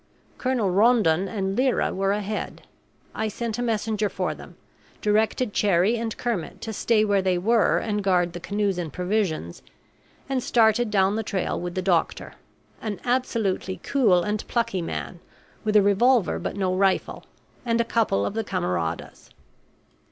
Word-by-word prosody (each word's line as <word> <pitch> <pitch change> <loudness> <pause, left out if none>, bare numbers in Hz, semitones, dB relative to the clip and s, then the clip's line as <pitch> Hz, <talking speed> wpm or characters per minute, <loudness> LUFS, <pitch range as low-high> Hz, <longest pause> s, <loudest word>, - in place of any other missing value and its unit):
Colonel 250 -7 0
Rondon 195 -4 +3
and 195 0 -2
Lyra 255 +1 +1
were 195 +1 0
ahead; 210 +1 -4 0.5
I 220 - -2
sent 230 +1 -4
a - - 0
messenger 220 -2 0
for - - -2
them, - - -13 0.4
directed 215 +2 +1
Cherrie 200 +2 +3
and 225 -1 -4
Kermit 225 -9 -3
to 220 - -5
stay 215 +1 +2
where 200 -2 +2
they 185 -1 +1
were 225 +5 +3
and 210 -2 -2
guard 180 -3 +2
the 175 - -6
canoes 200 +1 -1
and 165 -3 -4
provisions, 180 - -2 0.7
and 270 -2 -1
started 230 -1 +3
down 200 0 +2
the - - 0
trail 195 -5 -2
with 175 0 -5
the 185 - -2
doctor 175 -3 0 0.5
an 210 -4 -4
absolutely 230 -7 -1
cool 205 -11 +3
and 210 +1 -2
plucky 230 -6 -1
man, 170 +1 -5 0.4
with 215 -1 -1
a 210 - +7
revolver 210 +2 +3
but - - -4
no 190 -2 0
rifle 190 0 0 0.4
and 235 -2 0
a 235 - +2
couple 225 - +1
of - - -3
the 225 +1 -2
camaradas. 85 - -3
205 Hz, 160 wpm, -24 LUFS, 185-225 Hz, 0.7 s, a